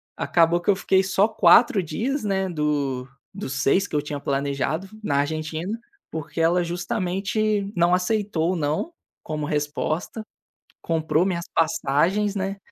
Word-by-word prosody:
acabou 170 0 +2
que 175 - -3
eu 200 - +5
fiquei 190 0 +2
só 190 +2 +3
4 220 +2 +5
dias, 240 - -2
né, 190 -2 0
do 145 -5 -1 0.3
dos 195 -9 -5
6 185 +9 +3
que - - -6
eu 150 - +2
tinha 150 -1 -5
planejado 140 +5 -1 0.2
na 140 -7 0
Argentina, 160 +7 -2 0.3
porque 160 +1 -4
ela 175 +2 +3
justamente 195 +4 -1
não 175 +1 +3
aceitou 185 -2 +1
o - - -2
“não”, 155 - -1 0.3
como 155 -1 -4
resposta. 150 +7 -2 0.6
Comprou 160 +1 +1
minhas 175 -3 -2
passagens, 175 +6 +1
né, 195 0 -2
175 Hz, 140 wpm, -24 LUFS, 150-195 Hz, 0.6 s, eu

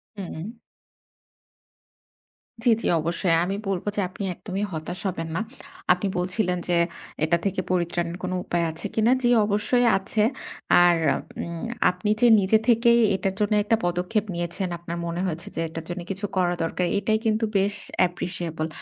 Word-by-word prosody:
হুম। 185 -3 -6 2.2
জ্বি, 240 - +5
জ্বি - - -1
অবশ্যই। 170 +1 +1
আমি 195 +2 -2
বলব 190 -3 -2
যে 205 - +1
আপনি 195 +2 -7
একদমই 195 +3 -4
হতাশ 170 +3 -5
হবেন 165 -3 -3
না। 165 - 0 0.5
আপনি 180 +3 -2
বলছিলেন 180 +1 0
যে 175 - +3 0.5
এটা 170 +2 +3
থেকে 195 - 0
পরিত্রাণের 175 -1 -1
কোন 185 - -2
উপায় 170 -1 0
আছে 160 - -8
কিনা। 225 +2 +3
জ্বি 245 -1 +3
অবশ্যই 210 +4 +2
আছে। 210 +2 0 0.6
আর 175 -1 +5 0.5
উম 170 -1 -6 0.3
আপনি 180 +3 -3
যে 245 - +7
নিজে 195 +3 +4
থেকেই 235 0 +5 0.2
এটার 190 0 -1
জন্য 210 0 +1
একটা 220 +2 +3
পদক্ষেপ 180 +5 0
নিয়েছেন 175 +2 -2
আপনার 170 0 -6
মনে 170 +1 -3
হয়েছে 170 +1 -3
যে 165 - -1
এটার 160 0 -7
জন্য 175 +1 -4
কিছু 195 +2 -3
করা 175 -1 +2
দরকার 170 +2 -1
এটাই 220 +1 +1
কিন্তু 220 0 +2
বেশ 200 +1 +1 0.3
অ্যাপ্রিশিয়েবল। 175 -3 -1
180 Hz, 155 wpm, -25 LUFS, 170-205 Hz, 2.2 s, যে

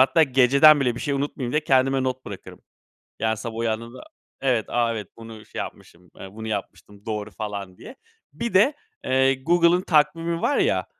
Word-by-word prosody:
Hatta 135 +5 +5
geceden 140 +2 +5
bile 125 -3 +1
bir - - -7
şey 145 - -2
unutmayayım 135 -3 -3
diye 150 0 0
kendime 135 -1 +2
not 130 0 -3
bırakırım. - - -10 0.6
Yani, 110 0 0
sabah 110 +1 -7
uyandığımda 115 +2 -3 0.4
Evet, 125 -5 +1
"A, 120 -1 0
evet 105 -4 -6
,bunu 115 -1 -11
şey - - -10
yapmışım, 90 +1 -9
eee, 95 - -9
bunu 110 +1 -7
yapmıştım. 105 0 -7
Doğru." 105 -1 -4
falan 100 -4 -6
diye. 260 - -12 0.4
Bir 235 0 -5
de, 210 +10 +5 0.3
eee, 130 +1 +3
Google'ın 175 +3 +3
takvimi 165 +1 +1
var 290 - +1
ya, - - +1
130 Hz, 175 wpm, -23 LUFS, 110-150 Hz, 0.6 s, Hatta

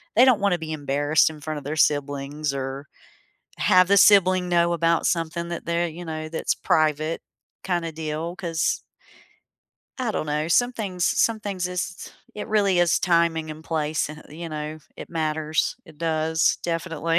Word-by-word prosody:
they 245 - +7
don't 250 -5 +5
want 200 -2 +3
to 175 - -1
be 160 -1 -6
embarrassed 145 +1 +2
in 155 -2 -11
front 155 0 -4
of - - -14
their 145 +3 -4
siblings 145 0 0
or 135 +1 -5 0.7
have 185 0 +5
the 200 - +5
sibling 185 -2 +5
know 170 0 +3
about 170 0 +2
something 170 0 -1
that 170 -1 -5
they're, 170 +1 0
you 170 +2 -8
know 155 -1 -5
that's 160 0 -1
private 155 +1 +1 0.4
kinda 175 -3 -1
deal 160 +2 -4
'cause 165 -2 -1 1.2
I 250 -3 -1
don't 155 - -2
know. 150 +1 -1
Some 245 +8 +3
things 185 -6 -3
some 225 -2 +2
things 185 -3 -3
is 175 -1 -5 0.2
it 210 - -6
really 200 -4 +2
is 175 -1 +3
timing 170 -2 +1
and 155 +1 -9
place 155 -2 -1
and 155 0 -10
you 165 +3 -7
know, 155 0 -5 0.2
it - - -9
matters. 155 -1 -1
It 160 -5 -17
does, 160 0 +1
definitely. 165 -1 -1
165 Hz, 170 wpm, -24 LUFS, 155-175 Hz, 1.2 s, they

